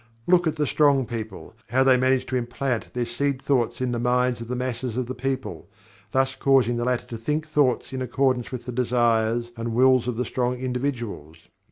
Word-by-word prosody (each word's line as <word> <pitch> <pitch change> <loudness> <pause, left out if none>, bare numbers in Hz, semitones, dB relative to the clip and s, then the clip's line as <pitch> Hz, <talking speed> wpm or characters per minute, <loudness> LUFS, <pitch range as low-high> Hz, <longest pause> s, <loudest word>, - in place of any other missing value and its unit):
Look 175 -1 +4
at 155 - 0
the 150 -1 0
strong 140 -2 +3
people, 110 -2 -7 0.2
how 130 +3 +3
they 130 -1 +5
manage 130 0 +2
to 130 - -4
implant 125 0 -2
their 120 -1 0
seed 135 +3 -1
thoughts 130 -4 0
in 130 -1 0
the 120 - -2
minds 125 0 +1
of 115 - -6
the 125 - -3
masses 125 -1 -3
of 130 - 0
the 130 - -5
people, 130 -9 -4 0.4
thus 135 0 +2
causing 130 -4 +3
the 120 - -1
latter 125 -1 0
to 115 - -7
think 150 +7 -2
thoughts 145 -5 +1
in 130 - -3
accordance 130 0 0
with 125 -2 -6
the 125 - -4
desires 120 -1 +1
and 115 0 -4
wills 130 -1 +4
of 125 -3 -2
the 125 - -1
strong 125 0 -1
individuals. 125 - -4
125 Hz, 205 wpm, -24 LUFS, 120-130 Hz, 0.4 s, they